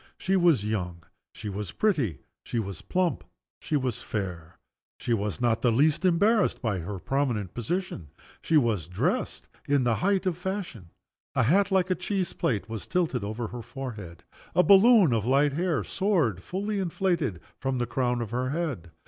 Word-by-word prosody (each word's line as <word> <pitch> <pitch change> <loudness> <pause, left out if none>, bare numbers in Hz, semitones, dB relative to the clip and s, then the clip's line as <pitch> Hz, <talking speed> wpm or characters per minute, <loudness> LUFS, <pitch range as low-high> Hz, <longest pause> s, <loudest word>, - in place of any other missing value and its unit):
She 190 - 0
was 170 - +4
young, 90 -5 -3 0.3
she 110 - -7
was 100 -2 -4
pretty, 140 - 0 0.2
she - - -4
was 100 -6 -3
plump, 180 -2 0 0.4
she 150 - -1
was 130 -4 -2
fair. 90 -5 -5 0.4
She 120 - -1
was 105 -1 -1
not 120 -2 +1
the 120 - +3
least 150 +8 +2
embarrassed 205 +6 +3
by 105 -7 -1
her 95 +4 -5
prominent 120 -4 -1
position. 120 - -3 0.3
She 160 - +3
was 110 - +1
dressed 90 +1 -2 0.2
in 140 -2 +3
the 115 -2 +2
height 195 +1 +2
of 185 - +2
the 165 - -16
fashion. 180 - -5 0.5
A - - +3
hat, 190 - +3
like 185 -1 +2
a 185 - -1
cheese 190 -1 -1
plate, 130 - -1
was 110 -1 -6
tilted 170 - 0
over 110 +3 -4
her 120 - -6
forehead. 110 - -8 0.3
A 180 - +6
balloon 200 - +7
of 110 -3 +1
light 135 +5 +3
brown 145 - -4
hair 175 -5 +1
soared, 170 - 0
fully 200 - -3
inflated, 175 - -1 0.2
from 135 -1 -1
the 120 - 0
crown 125 0 0
of 115 -2 -5
her 125 +1 -1
head. 140 - -3
130 Hz, 180 wpm, -27 LUFS, -, 0.5 s, balloon